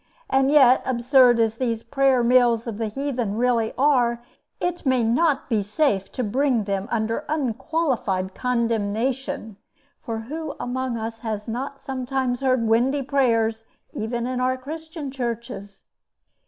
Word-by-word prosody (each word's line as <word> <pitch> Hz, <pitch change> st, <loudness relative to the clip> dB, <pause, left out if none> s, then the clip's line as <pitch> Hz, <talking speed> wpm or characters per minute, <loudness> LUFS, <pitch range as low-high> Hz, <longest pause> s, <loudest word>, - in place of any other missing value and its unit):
And 270 Hz, 0 st, +3 dB
yet, 265 Hz, -4 st, +6 dB
absurd 250 Hz, -1 st, +4 dB
as 225 Hz, -1 st, +1 dB
these 230 Hz, -3 st, -2 dB
prayer 265 Hz, 0 st, +2 dB
mills 240 Hz, -2 st, +4 dB
of 230 Hz, -3 st, -5 dB
the 225 Hz, -, -1 dB
heathen 245 Hz, -3 st, -2 dB
really 235 Hz, -2 st, +1 dB
are, 245 Hz, -4 st, +2 dB, 0.4 s
it 355 Hz, 0 st, -2 dB
may 260 Hz, -4 st, +2 dB
not 275 Hz, +6 st, +2 dB
be 225 Hz, -4 st, +1 dB
safe 205 Hz, -2 st, 0 dB
to 255 Hz, -, -2 dB
bring 250 Hz, +1 st, +1 dB
them 195 Hz, 0 st, -2 dB
under 225 Hz, +4 st, -1 dB
unqualified 255 Hz, -, -1 dB
condemnation: 230 Hz, -1 st, -1 dB, 0.4 s
for 225 Hz, -4 st, -4 dB
who 300 Hz, +5 st, -6 dB
among 255 Hz, -1 st, -2 dB
us 225 Hz, 0 st, -5 dB
has 215 Hz, -2 st, -4 dB
not 265 Hz, +5 st, -4 dB
sometimes 260 Hz, -2 st, -2 dB
heard 255 Hz, -3 st, +1 dB
windy 250 Hz, +5 st, +2 dB
prayers 230 Hz, -5 st, +1 dB, 0.3 s
even 235 Hz, +2 st, -3 dB
in 255 Hz, 0 st, -2 dB
our 255 Hz, 0 st, +1 dB
Christian 315 Hz, +1 st, -7 dB
churches? 235 Hz, -5 st, -5 dB
245 Hz, 140 wpm, -23 LUFS, 225-270 Hz, 0.4 s, yet